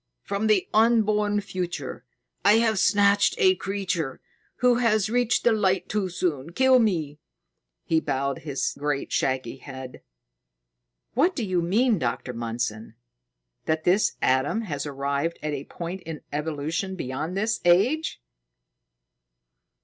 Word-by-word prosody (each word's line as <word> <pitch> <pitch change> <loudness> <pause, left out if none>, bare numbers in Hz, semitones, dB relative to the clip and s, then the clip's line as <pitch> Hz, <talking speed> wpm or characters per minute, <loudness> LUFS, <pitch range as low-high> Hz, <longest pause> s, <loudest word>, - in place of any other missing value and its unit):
From 200 +2 -1
the 210 -4 +3
unborn 215 -2 +3
future, 180 -7 -5 0.4
I 205 - +6
have 225 -2 +3
snatched 200 0 +4
a 380 -5 +5
creature 185 - -3 0.4
who 250 -1 +3
has 215 -3 +2
reached 245 -1 +2
the 240 - +4
Light 190 -4 +1
too 205 -3 -1
soon. 170 -3 -2
Kill 260 +3 +5
me!" 160 -10 0 0.6
He 160 - +2
bowed 140 -2 -2
his 140 -2 -3
great, 145 -1 -2
shaggy 130 -1 -1
head. 130 -1 -9 1.1
"What 330 +10 +2
do 240 - -2
you 185 -3 0
mean, 215 +5 +2
Dr. 125 -1 -2
Mundson: 115 -1 -4 0.7
that 155 0 0
this 190 +4 +3
Adam 130 - +2
has 150 -9 -4
arrived 140 +3 -2
at 150 -1 -2
a 140 -1 -5
point 175 +2 -6
in 160 -2 -7
evolution 155 +5 -2
beyond 155 +4 -4
this 220 +2 0
age?" 205 - +2
180 Hz, 130 wpm, -25 LUFS, 145-215 Hz, 1.1 s, I